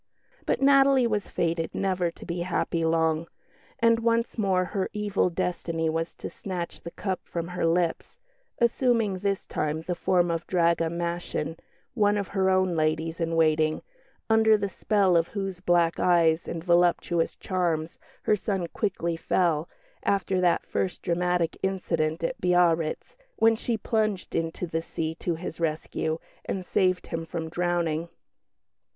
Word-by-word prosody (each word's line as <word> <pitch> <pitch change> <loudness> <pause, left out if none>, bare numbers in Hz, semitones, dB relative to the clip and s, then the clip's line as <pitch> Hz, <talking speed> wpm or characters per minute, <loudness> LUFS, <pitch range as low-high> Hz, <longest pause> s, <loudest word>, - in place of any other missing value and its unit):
But - - +1
Natalie 275 -2 +5
was 210 -3 -1
fated 165 -1 -1
never 185 -3 0
to 170 - -12
be 175 +1 -3
happy 170 -1 -1
long, 160 0 +1 0.5
and 230 -2 +4
once 230 0 +1
more 190 -4 +1
her 190 0 -2
evil 205 -3 +1
Destiny 165 -2 -1
was 165 +1 -3
to - - -6
snatch 180 -3 -6
the 170 - -7
cup 190 +2 -3
from 170 0 -5
her 180 -2 -1
lips, 170 0 -1 0.4
assuming 235 -4 +2
this 200 0 -1
time 155 +1 -2
the 180 - -2
form 175 0 +2
of 165 0 -3
Draga 170 -2 +2
Maschin, 170 -2 -3 0.4
one 210 -3 +3
of 200 -2 -3
her 190 -1 +1
own 185 -2 +2
ladies 160 +1 0
in 165 0 0
waiting, 155 -1 +2 0.4
under 220 -1 +5
the 200 -1 -1
spell 195 -1 +2
of 165 0 +3
whose 195 -3 -4
black 175 -2 +2
eyes 170 -2 +3
and 165 -1 -4
voluptuous 175 -1 +2
charms 170 -4 -2 0.2
her 215 - +3
son 195 -3 -2
quickly 170 -5 -1
fell, 165 -2 +1 0.3
after 195 -2 +1
that 175 -1 +2
first 185 - -2
dramatic 175 -1 0
incident 165 -4 -1
at - - -2
Biarritz, 175 - +2 0.2
when 225 0 +4
she 230 0 -2
plunged 215 -4 -1
into 165 +2 -2
the 165 -1 -2
sea 160 -1 -3
to 175 - -1
his 165 0 -7
rescue 160 0 -1 0.3
and 185 -1 -4
saved 185 0 +1
him 165 -1 -4
from 165 -1 -5
drowning. 170 -1 -1
175 Hz, 150 wpm, -27 LUFS, 165-195 Hz, 0.5 s, Natalie